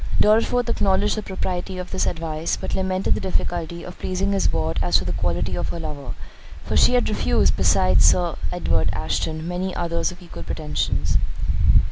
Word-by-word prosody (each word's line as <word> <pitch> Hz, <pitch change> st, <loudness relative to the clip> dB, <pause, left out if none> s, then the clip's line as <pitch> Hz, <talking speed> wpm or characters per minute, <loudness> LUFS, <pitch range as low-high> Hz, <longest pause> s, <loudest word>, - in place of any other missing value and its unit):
Dorriforth 230 Hz, +3 st, +3 dB
acknowledged 200 Hz, -2 st, +2 dB
the 215 Hz, -, -2 dB
propriety 185 Hz, -1 st, -4 dB
of 180 Hz, 0 st, -6 dB
this -, -, 0 dB
advice, 160 Hz, -1 st, -2 dB
but -, -, -5 dB
lamented 190 Hz, 0 st, +1 dB
the -, -, -2 dB
difficulty 170 Hz, -2 st, -2 dB
of 180 Hz, -, -10 dB
pleasing 190 Hz, +2 st, -1 dB
his 195 Hz, -1 st, +2 dB
ward 80 Hz, 0 st, -1 dB
as 90 Hz, 0 st, +3 dB
to 90 Hz, -, -2 dB
the 90 Hz, -, -2 dB
quality 90 Hz, +1 st, -1 dB
of -, -, -2 dB
her 170 Hz, -, -4 dB
lover; 145 Hz, -, -6 dB, 0.5 s
for -, -, -3 dB
she 250 Hz, -, +5 dB
had 245 Hz, -, +2 dB
refused, 80 Hz, -, +2 dB
besides 90 Hz, 0 st, +4 dB
Sir 175 Hz, -2 st, +4 dB, 0.2 s
Edward 80 Hz, -, 0 dB
Ashton, 95 Hz, -, -2 dB
many 180 Hz, +1 st, -3 dB
others 170 Hz, +1 st, -1 dB
of 180 Hz, -, -12 dB
equal 170 Hz, -, -9 dB
pretensions. 85 Hz, -, -1 dB
170 Hz, 175 wpm, -23 LUFS, -, 0.5 s, she